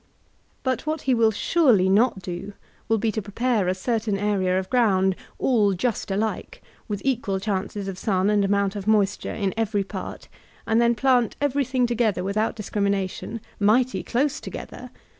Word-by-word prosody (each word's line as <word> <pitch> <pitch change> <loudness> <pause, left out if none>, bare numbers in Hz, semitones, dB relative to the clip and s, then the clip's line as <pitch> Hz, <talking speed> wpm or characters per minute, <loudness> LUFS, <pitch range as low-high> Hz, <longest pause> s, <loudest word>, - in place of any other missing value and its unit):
But 260 +3 -1
what 310 0 -1
he 260 - +1
will 230 -2 +4
surely 220 - +3
not 200 0 +2
do, 180 +3 -6 0.3
will 225 - +2
be 220 +1 0
to 220 - -3
prepare 215 0 0
a 185 - +1
cer 225 +5 0
tain 210 -2 -2
area 195 -3 +1
of 190 0 -2
ground 190 -7 +3 0.2
all 215 -6 +2
just 220 +3 -2
alike, 210 +3 -3 0.2
with 205 -3 -4
equal 225 -7 0
chances 200 0 -3
of 190 -2 -5
sun 195 -1 +1
and 205 -1 +3
amount 200 0 +1
of 200 0 -6
moisture 205 -2 +1
in 195 -3 -1
every 215 -2 0
part, - - -7 0.4
and 225 +1 +2
then 235 0 +3
plant 245 0 +2
everything 270 -3 +1
together 230 -6 0
without 215 +4 0
discrimination, 200 +1 -2
— - - -30
mighty 255 +1 +1
dose 270 +4 0
together! - - -8
210 Hz, 170 wpm, -24 LUFS, 195-240 Hz, 0.4 s, will